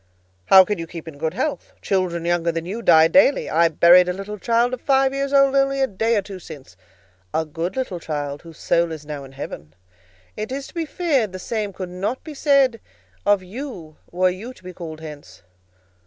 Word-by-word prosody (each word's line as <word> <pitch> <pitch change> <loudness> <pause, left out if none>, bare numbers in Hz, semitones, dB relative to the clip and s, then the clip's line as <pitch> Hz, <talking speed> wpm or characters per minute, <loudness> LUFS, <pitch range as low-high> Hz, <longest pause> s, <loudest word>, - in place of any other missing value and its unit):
"How 190 -1 +8
can 205 -1 -2
you 165 - -5
keep 165 -1 -9
in 145 -3 -10
good 160 +2 -2
health? 280 +5 -3
Children 180 -3 -1
younger 170 -1 +1
than 165 0 -4
you 205 +6 -5
die 160 -7 +6
daily. 280 +7 +4
I 165 +1 +4
buried 175 +3 +6
a - - 0
little 200 +2 -7
child 235 +3 +1
of 255 - -4
five 270 -1 +2
years 275 0 -2
old 275 -1 +4
only 275 0 +2
a 270 - +4
day 225 +1 0
or 200 - 0
two 190 -1 -9
since,—a 95 - -8
good 165 +4 -4
little 250 -9 -3
child, 145 -3 -4
whose 165 -2 -13
soul 170 0 +1
is 155 -2 -7
now 145 -2 -6
in 135 - -14
heaven. 80 - -8 0.6
It 215 +3 -5
is 275 +1 -4
to - - -17
be 335 -3 -3
feared 280 - 0
the - - -5
same 210 +1 -3
could 185 -1 -7
not 200 +8 -3
be 310 - -8
said 275 -5 +3 0.5
of 205 -2 +3
you 185 - -8
were 185 +1 +2
you 225 +8 -8
to 185 - -20
be 185 0 -9
called 160 -3 -8
hence." 145 - -11
185 Hz, 210 wpm, -22 LUFS, 160-245 Hz, 0.6 s, How